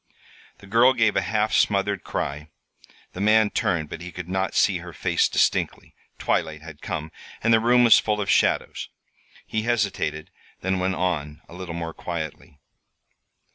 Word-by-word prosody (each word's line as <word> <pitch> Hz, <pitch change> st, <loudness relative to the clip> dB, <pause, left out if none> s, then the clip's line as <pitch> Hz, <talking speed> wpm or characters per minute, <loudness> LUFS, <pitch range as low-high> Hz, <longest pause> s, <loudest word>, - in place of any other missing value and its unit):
The -, -, -16 dB
girl 115 Hz, +6 st, +5 dB
gave 115 Hz, -4 st, +2 dB
a 95 Hz, -, +3 dB
half 105 Hz, +3 st, 0 dB
smothered 100 Hz, -1 st, +1 dB
cry. 75 Hz, +2 st, -4 dB, 0.6 s
The 90 Hz, -, -6 dB
man 110 Hz, 0 st, +4 dB
turned, 95 Hz, -10 st, 0 dB
but 80 Hz, -, -8 dB
he 90 Hz, 0 st, -7 dB
could 90 Hz, +1 st, -7 dB
not 95 Hz, +1 st, -2 dB
see 95 Hz, -3 st, +3 dB
her 85 Hz, 0 st, -10 dB
face -, -, +1 dB
distinctly. -, -, 0 dB, 0.2 s
Twilight 80 Hz, -1 st, -1 dB
had 80 Hz, -2 st, -11 dB
come, 80 Hz, +1 st, -4 dB, 0.3 s
and 115 Hz, +1 st, +4 dB
the 110 Hz, -, +6 dB
room 120 Hz, +2 st, +4 dB
was 115 Hz, -, +7 dB
full 105 Hz, -1 st, -1 dB
of 100 Hz, -, -2 dB
shadows. -, -, +1 dB, 0.6 s
He 110 Hz, -, -2 dB
hesitated, 100 Hz, -9 st, -1 dB, 0.3 s
then 95 Hz, 0 st, 0 dB
went 95 Hz, +1 st, 0 dB
on, 75 Hz, -4 st, -2 dB
a -, -, -14 dB
little 90 Hz, -2 st, -7 dB
more 85 Hz, -1 st, -4 dB
quietly. 80 Hz, -4 st, -6 dB
95 Hz, 165 wpm, -24 LUFS, 80-110 Hz, 0.6 s, was